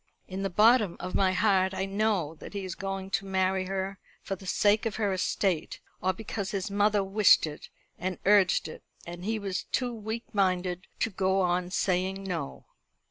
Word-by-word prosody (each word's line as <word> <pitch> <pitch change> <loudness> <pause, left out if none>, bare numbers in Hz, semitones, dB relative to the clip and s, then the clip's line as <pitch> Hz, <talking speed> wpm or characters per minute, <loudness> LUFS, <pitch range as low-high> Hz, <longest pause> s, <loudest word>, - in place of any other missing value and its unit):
"In 190 +1 -5
the 195 - -1
bottom 215 -1 +4
of 180 - -5
my 190 -1 +3
heart 190 -1 +2
I 190 - -1
know 195 -5 0
that - - -10
he 200 -2 -4
is 185 - -4
going 195 0 -5
to 195 0 0
marry 190 0 +1
her 190 0 -3 0.2
for 195 - -3
the 190 0 -12
sake 210 +4 +3
of 215 - -4
her 205 -3 0
estate, 185 -2 -1 0.2
or 185 - +2
because 200 0 -5
his 200 0 -3
mother 205 0 +2
wished 195 -1 +5
it 150 -1 -8 0.3
and 185 0 -2
urged 200 -2 +4
it, 155 - -9 0.2
and 175 +1 -8
he 220 +3 -1
was 195 -3 -3
too 250 -2 -1
weak 220 +1 -5
minded 185 -2 0
to 225 - +1
go 190 0 +1
on 180 0 0
saying 190 +1 0
No. 170 -7 -5
195 Hz, 190 wpm, -28 LUFS, 185-205 Hz, 0.3 s, wished